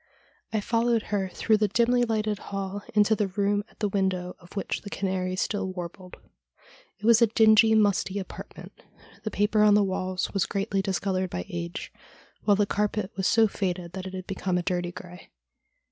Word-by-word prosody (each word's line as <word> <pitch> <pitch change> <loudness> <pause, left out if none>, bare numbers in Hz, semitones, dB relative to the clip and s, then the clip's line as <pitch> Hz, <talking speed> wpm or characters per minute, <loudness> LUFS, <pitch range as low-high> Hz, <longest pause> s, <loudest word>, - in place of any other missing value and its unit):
I 215 - 0
followed 230 +1 +1
her 195 -2 0
through 215 +3 +2
the 210 0 +2
dimly 235 +4 +2
lighted 215 -2 -1
ball 195 0 -4
into 210 +1 +4
the 210 -1 0
room 205 +1 0
at - - -25
the 210 - +2
window 190 -2 -1
of 175 +2 -17
which 195 - -2
the 200 - -8
canary 185 -2 -2
still 190 0 -1
warbled. 180 0 -8 0.8
It 205 - -9
was 230 0 +6
a 235 - +7
dingy, 220 0 +5
musty 205 -2 +2
apartment. 190 - -8 0.5
The 215 - -2
paper 210 +1 +2
on 210 -1 +6
the 205 - +5
walls 185 -1 -2
was 195 -3 +1
greatly 195 0 -1
discoloured 190 -1 -1
by 90 - -4
age, 85 0 -6 0.5
while 205 -1 +5
the 205 - +3
carpet 210 -1 -1
was 190 0 0
so 225 -1 +5
faded 180 -4 -3
that 190 0 -5
it 190 - -7
had 185 -1 -6
become 185 -1 -2
a 180 - -1
dirty 175 -1 -1
grey. 180 0 -11
200 Hz, 185 wpm, -27 LUFS, 185-210 Hz, 0.8 s, a